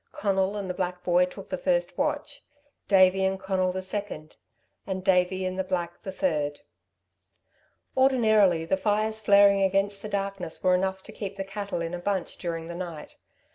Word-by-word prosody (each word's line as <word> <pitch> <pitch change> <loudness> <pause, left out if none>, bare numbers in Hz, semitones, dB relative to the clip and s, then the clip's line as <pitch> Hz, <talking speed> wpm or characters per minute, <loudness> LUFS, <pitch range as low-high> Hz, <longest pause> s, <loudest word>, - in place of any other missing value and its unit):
Conal 195 0 0
and 200 -2 -4
the 180 - -2
black 180 -1 -3
boy 180 0 +4
took 180 - -11
the - - -3
first - - 0
watch, - - -2 0.5
Davey 190 -1 +5
and 190 0 0
Conal 190 -1 0
the 185 +1 -4
second, 185 -6 -5 0.5
and 190 -1 -3
Davey 185 0 +2
and 185 0 -3
the - - +1
black 175 -2 -3
the 190 - -6
third. 150 -6 -1 1.3
Ordinarily 220 -10 +4
the 190 +3 +1
fires 215 +2 0
flaring 200 -1 +5
against 195 +1 +1
the 215 - -6
darkness 195 -4 -3
were 185 -1 +4
enough 190 +1 0
to - - -9
keep 200 -2 -6
the 195 - -3
cattle 200 -2 -4
in 165 +1 -4
a 180 - -3
bunch 190 -1 -2
during 165 -2 -4
the 170 - -6
night. 170 -3 -7
190 Hz, 175 wpm, -27 LUFS, 180-200 Hz, 1.3 s, Davey